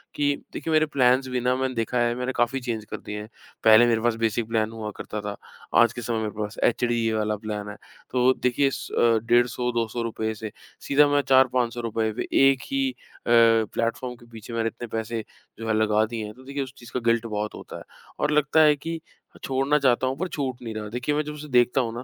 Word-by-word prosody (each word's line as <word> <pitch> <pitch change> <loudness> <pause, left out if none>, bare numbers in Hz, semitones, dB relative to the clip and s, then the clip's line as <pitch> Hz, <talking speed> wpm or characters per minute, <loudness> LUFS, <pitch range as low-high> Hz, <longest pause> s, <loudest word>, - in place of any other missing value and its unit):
कि 145 -1 +1 0.2
देखिए 160 - -4
मेरे 155 0 +4
प्लान्स 130 -3 +2
भी 125 -1 -1
मैंने 130 +1 0
देखा 115 +2 -1
है, 120 0 +1
मैंने 125 +1 -2
काफ़ी 120 +3 +1
चेंज 115 -3 -3
कर - - -6
दिए 105 0 -6
हैं। 105 - -10 0.3
पहले 110 +1 +8
मेरे 115 -1 +2
पास 120 -1 +1
बेसिक 115 0 0
प्लान 110 -1 0
हुआ 110 -2 -5
करता 105 -1 -5
था, 105 0 -5 0.5
आज 120 0 +4
के 120 - -6
समय 115 0 -2
मेरे 110 -1 -2
पास 105 +1 -4
एचडी 120 -1 +1
वाला 110 -1 0
प्लान 105 -1 -4
है। 105 - -7 0.4
तो 125 -1 +1
वो 130 - +6
देखिए 125 +2 +3
स - - -6
अ, 115 -1 +3
₹150-200 120 -2 0
से 110 0 -7 0.4
सीधा 145 +1 +5
मैं 145 0 +2
₹400-500 120 -4 +1 0.2
एक 135 -2 0
ही 275 -1 +1
अ, - - -20 0.3
प्लेटफॉर्म 115 +1 +2
के 120 - -18
पीछे 115 +1 -10
मैंने 115 -1 0
इतने 120 +1 -6
पैसे 115 0 -3 0.4
जो 115 - -5
हैं 110 - +1
लगा 110 0 +3
दिए 115 0 -5
हैं 105 - -8
तो 130 +3 -16
देखिए 140 +1 -3
उस 130 0 -10
चीज़ 120 - -13
का 125 - 0
गिल्ट 115 0 +2
बहुत 105 -1 -3
होता - - -9
है - - -10 0.4
और 150 - +1
लगता 150 +1 +3
है 150 -1 +6
कि 165 +3 -5 0.4
छोड़ना 135 +2 +1
चाहता 130 -2 +2
हूँ 130 +1 -2
पर 185 - -1
छूट 135 -7 -4
नहीं 115 -2 -6
रहा। 105 -1 -4
देखिए 125 +6 -2
मैं 150 - +1
जब 150 0 -6
उसे 150 0 -9
देखता 125 +1 +3
हूँ 115 -2 -3
ना, 120 - -5
120 Hz, 225 wpm, -25 LUFS, 110-130 Hz, 0.5 s, पहले